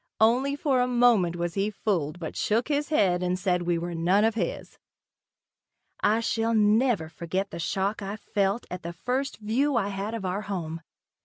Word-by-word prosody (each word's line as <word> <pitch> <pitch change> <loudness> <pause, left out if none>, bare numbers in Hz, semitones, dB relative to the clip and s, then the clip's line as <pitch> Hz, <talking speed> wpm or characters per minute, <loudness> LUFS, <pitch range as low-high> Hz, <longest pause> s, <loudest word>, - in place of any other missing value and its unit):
Only 250 +6 +3
for 275 -3 +1
a 250 - +2
moment 240 -8 +3
was 175 -1 -2
he 200 +1 0
fooled 180 -7 -1
but 160 - -6
shook 230 +6 0
his 290 0 0
head 190 - +2
and 180 0 0
said 180 -1 0
we 175 -1 0
were 170 +1 -4
none 175 +5 +2
of 225 0 +3
his. 225 - -4 1.2
I 215 +2 +2
shall 225 0 0
never 215 -3 +3
forget 185 +4 -3
the - - -6
shock 195 +5 -1
I 200 +1 -4
felt 200 +1 -1
at 180 0 -5
the 170 +1 -6
first 255 +9 -2
view 250 +7 0
I 200 -4 +1
had 200 +3 -3
of 210 -4 -5
our 185 +2 -1
new - - -11
home. 165 -5 -4
205 Hz, 190 wpm, -27 LUFS, 180-230 Hz, 1.2 s, Only